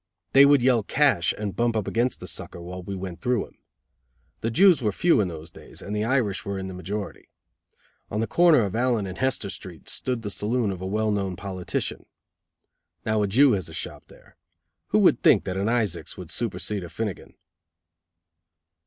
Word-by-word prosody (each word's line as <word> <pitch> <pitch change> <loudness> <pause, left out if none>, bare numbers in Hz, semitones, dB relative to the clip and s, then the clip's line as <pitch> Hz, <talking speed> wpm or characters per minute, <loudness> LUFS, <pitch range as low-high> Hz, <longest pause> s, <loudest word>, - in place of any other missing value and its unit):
They 135 +1 +9
would 140 -3 +5
yell 125 -3 +4
"cash" 115 - +2
and 105 -2 -4
bump 120 -1 +1
up 110 -3 -1
against 120 +2 0
the - - -6
sucker, - - -6
while 90 +2 -7
we 100 +2 -6
went 90 -2 -7
through 125 -3 0
him. - - -22 0.8
The 115 - -1
Jews 175 - +5
were 105 -3 +1
few 165 - +3
in 100 - 0
those 80 -1 -8
days, - - -13
and 105 - -5
the 105 - 0
Irish 115 -5 0
were 100 -2 -4
in 95 0 -4
the 95 - -7
majority. 95 +2 -6 0.8
On 105 - -2
the 115 - +1
corner 170 0 +5
of 100 - -4
Allen 120 -3 +1
and 95 -1 -7
Hester 130 -7 0
Streets 85 -4 -8
stood 125 -3 -2
the 105 - -4
saloon 110 +1 -1
of 95 -1 -6
a 95 - -3
well 110 +2 0
known 100 -3 -1
politician. 95 -1 -4 1.0
Now 110 -1 +1
a 105 - +1
Jew 130 +7 +5
has 95 -6 -1
a - - -9
shop - - -6
there. - - -20 0.5
Who - - +2
would - - +4
think - - +5
that 90 - -4
an 100 +3 0
Isaacs 110 -8 -1
would - - -8
supersede 105 -3 -3
a 85 - -8
Finnigan? 105 -2 -5
105 Hz, 195 wpm, -25 LUFS, 95-120 Hz, 1.0 s, They